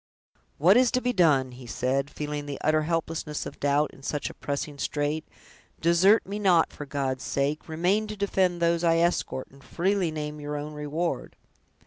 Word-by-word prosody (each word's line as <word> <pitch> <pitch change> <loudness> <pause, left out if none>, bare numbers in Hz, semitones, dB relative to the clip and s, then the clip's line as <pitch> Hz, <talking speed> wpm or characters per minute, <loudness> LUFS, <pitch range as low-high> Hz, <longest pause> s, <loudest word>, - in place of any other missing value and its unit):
"What 180 +9 +6
is 250 -1 +5
to 255 - +3
be 250 0 -1
done!" 145 - +3
he 125 0 -11
said, 130 +4 -1
feeling 150 -1 -5
the 140 - -5
utter 155 0 +3
helplessness 165 -1 -2
of - - -8
doubt 145 +1 +2
in - - -16
such 145 +2 -3
a - - -13
pressing 145 0 -4
strait; 150 +2 -1 0.5
"desert 175 +6 +4
me 200 +2 -4
not, 180 -5 +3
for 145 - -8
God's 135 -3 -2
sake! 145 +4 -1
remain 180 +7 +1
to 215 0 -6
defend 185 -3 +1
those 170 0 +2
I 165 -1 +4
escort, 170 -6 0
and 135 0 -18
freely 190 0 0
name 150 -1 -5
your 145 0 -4
own 150 +1 -5
reward!" 150 +3 -3
155 Hz, 180 wpm, -27 LUFS, 145-175 Hz, 0.5 s, What